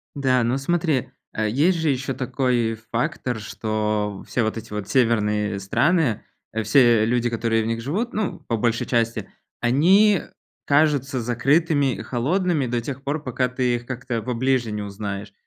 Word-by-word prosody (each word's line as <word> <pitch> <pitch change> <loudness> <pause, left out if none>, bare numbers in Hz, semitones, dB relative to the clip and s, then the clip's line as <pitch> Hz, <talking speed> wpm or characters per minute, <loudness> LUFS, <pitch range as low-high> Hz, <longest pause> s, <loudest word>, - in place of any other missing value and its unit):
Да, 130 -3 +2
ну, 120 +3 +1
смотри, 155 -1 0 0.2
э, 110 0 -1
есть 160 - +2
же 160 - +1
ещё 135 0 -1
такой 125 -3 0 0.2
фактор, 120 0 -2
что 105 -1 -2
все 120 - 0
вот 110 +1 -2
эти 110 -1 -8
вот 105 -2 -5
северные 105 -5 +1
страны, 140 - +1 0.4
все 115 -1 +5
люди, 120 0 +1
которые 115 -1 0
в 110 - -3
них 115 0 -1
живут, 200 - -2
ну, 210 -3 -2
по 115 - 0
большей 115 +1 0
части- 115 -3 -1 0.3
они 185 - +4 0.4
кажутся 145 -3 +2
закрытыми 140 +4 +2
и - - -7
холодными 145 - 0
до 120 0 -1
тех 135 +2 -6
пор, 145 +2 -2
пока 125 0 0
ты 125 -1 0
их 120 0 -6
как-то 125 -2 -4
поближе 125 0 0
не 105 0 -3
узнаешь. 100 0 -6
125 Hz, 160 wpm, -23 LUFS, 110-140 Hz, 0.4 s, все